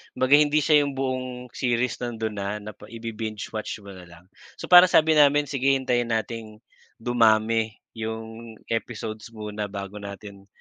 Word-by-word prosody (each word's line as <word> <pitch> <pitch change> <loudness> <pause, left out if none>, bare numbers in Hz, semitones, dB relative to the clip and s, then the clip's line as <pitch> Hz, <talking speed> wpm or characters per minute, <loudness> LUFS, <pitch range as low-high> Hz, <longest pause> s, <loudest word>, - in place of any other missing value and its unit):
kumbaga 130 +3 +5
hindi 150 0 +3
siya 150 -2 +5
'yong 140 -1 -4
buong 130 -1 -2 0.3
series 125 -1 -1
nando'n 110 -3 -4
na 100 0 -3 0.2
na 105 - -7
pa - - -15
ibi-binge-watch 110 -2 -6
mo 100 - -10
na 90 -2 -12
lang. 85 +1 -16 0.3
So, - - -9
parang 180 0 +10
sabi 160 0 +5
namin, 145 0 +5
sige 135 -1 -1
hintayin 125 -3 0
nating 110 -1 -4 0.4
dumami 115 -1 +2 0.2
'yong 110 0 -6 0.2
episodes 110 -1 -4
muna 105 -1 -5
bago 100 +1 -7
natin 100 0 -10
115 Hz, 155 wpm, -25 LUFS, 105-130 Hz, 0.4 s, parang